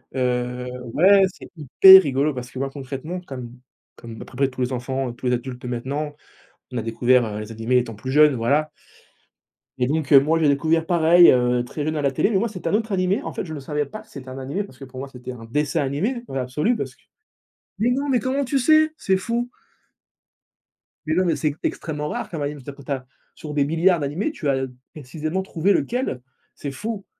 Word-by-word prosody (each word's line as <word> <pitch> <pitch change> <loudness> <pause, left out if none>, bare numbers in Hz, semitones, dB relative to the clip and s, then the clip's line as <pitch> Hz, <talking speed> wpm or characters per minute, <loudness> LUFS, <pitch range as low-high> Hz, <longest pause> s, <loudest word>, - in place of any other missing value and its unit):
heu, 125 -1 -1 0.3
ouais, 195 +4 +6
c'est - - -13
hyper 190 +6 +8
rigolo 140 +1 0
parce 125 -1 -7
que, 130 - -7
moi, 135 0 -1
concrètement, 140 +6 -6
comme 125 -7 -8 0.4
comme 115 -2 -10
à - - -8
peu - - -15
près 135 +1 +2
tous 130 -1 -7
les 125 +1 -1
enfants, 130 0 -3
tous 125 +1 -5
les 125 - +2
adultes 125 0 -4
de - - -7
maintenant, 140 +5 -3 0.6
on 125 - -2
a - - -2
découvert, 120 +2 +2
heu, 105 0 -5
les 105 +1 -7
animés 115 +3 +1
étant 120 -3 -3
plus 130 +5 -6
jeunes, 150 0 +6
voilà 145 +7 +1 1.1
et 125 -1 +1
donc 150 0 -1
heu, 140 - +10
moi, 155 +4 +1
j'ai 155 - +3
découvert 160 +3 +2
pareil, 170 0 +6
heu, 125 -1 +2
très 145 +4 -5
jeune 155 +1 -2
à 150 - -1
la 140 - +1
télé 135 - +1
mais 205 - +2
moi, 230 +5 +1
c'est 190 -4 -6
un - - 0
autre 220 +1 0
animé, 185 +1 +1
en - - -5
fait, - - -4
je 160 - -7
le 150 - -5
savais 150 +2 -2
pas 215 +9 -9
que 220 - -21
c'était 135 -8 -10
un 130 - -8
animé 140 +10 -3
parce 165 -10 -14
que 135 - -9
pour 130 0 -10
moi, 135 - -5
c'était 125 -1 -9
un 115 -2 -10
dessin 150 +6 0
animé, 195 - -2
dans - - -10
l'absolu 135 - 0
parce - - -5
que - - -31 0.8
mais 230 - +2
non, 275 +3 -1
mais 255 -3 +3
comment 270 +3 -1
tu 270 +2 0
sais? 310 +4 +4
C'est 190 -1 +1
fou! 235 +5 -2 1.6
Mais 155 - 0
non, 185 +1 +2
mais 170 - +2
c'est 150 -2 -1
extrêmement 150 -2 -3
rare, - - -4
quand 165 - -5
même, 145 0 -4
tu 130 - -9
as - - -6
tu 140 0 -10
as 130 -2 -3 0.3
sur 155 -3 -8
des 145 -1 +2
milliards 165 +4 +3
d'animés, 150 - -2
tu 165 - -3
as 135 -1 0 0.3
précisément 155 +4 -4
trouvé 190 0 0
lequel, 240 - -1 0.3
c'est 140 - -5
fou! 205 +7 -5
145 Hz, 230 wpm, -22 LUFS, 130-180 Hz, 1.6 s, heu